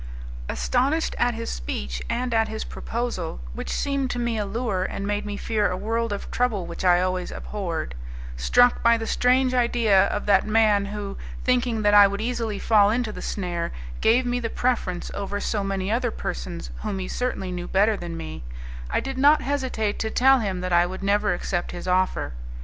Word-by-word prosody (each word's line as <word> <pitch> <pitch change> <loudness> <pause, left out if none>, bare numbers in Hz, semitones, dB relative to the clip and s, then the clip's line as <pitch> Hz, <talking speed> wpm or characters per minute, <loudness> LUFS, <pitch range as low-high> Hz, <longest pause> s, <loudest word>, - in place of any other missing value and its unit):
Astonished 275 +6 0
at 245 -1 +2
his 230 - -4
speech - - -4
and 245 0 -1
at 225 -1 +3
his 220 0 -4
proposal, 235 - -4
which - - -6
seemed 275 -2 -1
to 245 - -3
me 235 -1 -1
a 210 -2 -2
lure 220 -3 -1
and 195 +1 -4
made 205 +1 -2
me 205 0 -4
fear 215 -2 0
a 180 - -2
world 230 +2 -1
of 200 - -5
trouble 230 -7 0
which 170 - -6
I 175 -1 +5
always 185 0 -1
abhorred, 175 - -4 0.4
struck 245 - +4
by 235 0 +5
the 225 - -4
strange 255 +2 +2
idea 235 -5 +3
of 210 - -3
that 200 0 +4
man 215 -2 +3
who, 200 -1 -5 0.3
thinking 245 -3 +1
that 205 0 +4
I 205 -1 +9
would 200 +1 -4
easily 230 -2 -2
fall 205 -1 +4
into 230 0 0
the - - -8
snare, 175 -4 -3 0.3
gave 245 +3 +4
me 245 0 0
the 230 -2 -3
preference 225 -9 -1
over 200 0 -3
so 205 -1 -1
many 195 0 -2
other 240 +2 +1
persons - - -5
whom 195 - -3
he 185 -1 -4
certainly 245 -7 -2
knew 175 0 -4
better 210 +3 +3
than 170 -3 -6
me, 80 -4 -7 0.5
I - - 0
did 270 -1 -4
not 295 +3 +5
hesitate 260 -7 -1
to 220 - -1
tell 265 +3 +5
him 195 -5 -2
that 185 -1 -2
I 175 0 +5
would 185 +2 -7
never 205 +1 +2
accept 175 -2 -3
his 175 - -7
offer. 185 - +1
210 Hz, 195 wpm, -24 LUFS, 190-240 Hz, 0.5 s, I